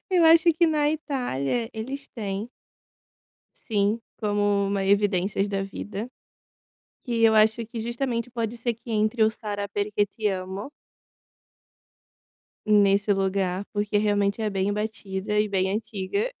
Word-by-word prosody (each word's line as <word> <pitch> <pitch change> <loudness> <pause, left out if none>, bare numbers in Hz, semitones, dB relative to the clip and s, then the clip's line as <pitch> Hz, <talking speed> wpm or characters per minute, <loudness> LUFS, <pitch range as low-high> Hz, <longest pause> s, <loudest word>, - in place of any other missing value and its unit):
Eu 355 -3 +4
acho 330 +1 +7
que 335 +2 +3
na 300 -2 +2
Itália 245 - -2
eles 265 +5 -6
têm 205 0 -4 1.1
sim, 210 0 0 0.2
como 205 -1 +1
uma 195 0 0
evidências 200 0 +2
da 195 -1 -1
vida, 200 +2 -5 1.0
e 235 -2 0
eu 220 -1 +6
acho 220 +2 +4
que 230 0 -6
justamente 235 +1 -2
pode 230 -1 -3
ser 235 0 -1
que 235 +2 -12
entre 220 +1 +1
o 220 - +5
Sarà 205 -2 -4
Perché 205 +1 0
Ti 215 +1 -4
Amo. 190 +5 -4 2.0
Nesse 205 -1 +4
lugar, 195 -1 0
porque 205 0 0
realmente 205 0 +1
é 215 - 0
bem 195 0 0
batida, 210 -1 -2
e 210 - +2
bem 190 -1 0
antiga, 215 - -2
210 Hz, 135 wpm, -25 LUFS, 200-230 Hz, 2.0 s, acho